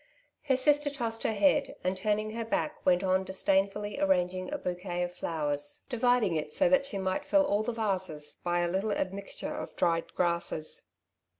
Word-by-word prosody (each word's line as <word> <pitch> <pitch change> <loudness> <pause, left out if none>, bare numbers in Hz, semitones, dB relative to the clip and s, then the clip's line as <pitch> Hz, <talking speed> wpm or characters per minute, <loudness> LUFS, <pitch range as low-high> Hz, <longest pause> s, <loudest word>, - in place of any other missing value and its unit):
Her 265 -3 +3
sister 290 +2 +4
tossed 235 -5 -2
her - - +1
head, 280 +7 +2
and 185 +1 0
turning 210 +2 0
her 230 +1 -3
back 165 -8 -2
went 180 0 +4
on 190 0 +2
disdainfully 195 +2 0
arranging 185 -1 +1
a - - -1
bouquet 180 0 -3
of 175 0 -4
flowers, 145 -4 -2
dividing 245 -6 +2
it 150 -1 -2
so 280 - +3
that 275 0 +3
she 210 - -4
might 190 -1 -1
fill 295 -1 +3
all 205 -6 +1
the 215 - -2
varses 190 -9 -2
by 175 0 +1
a 175 - +1
little 190 +5 -1
admixture 195 +1 -4
of - - -6
dried 165 -1 +1
grasses. 170 -3 0
190 Hz, 180 wpm, -30 LUFS, 175-225 Hz, -, sister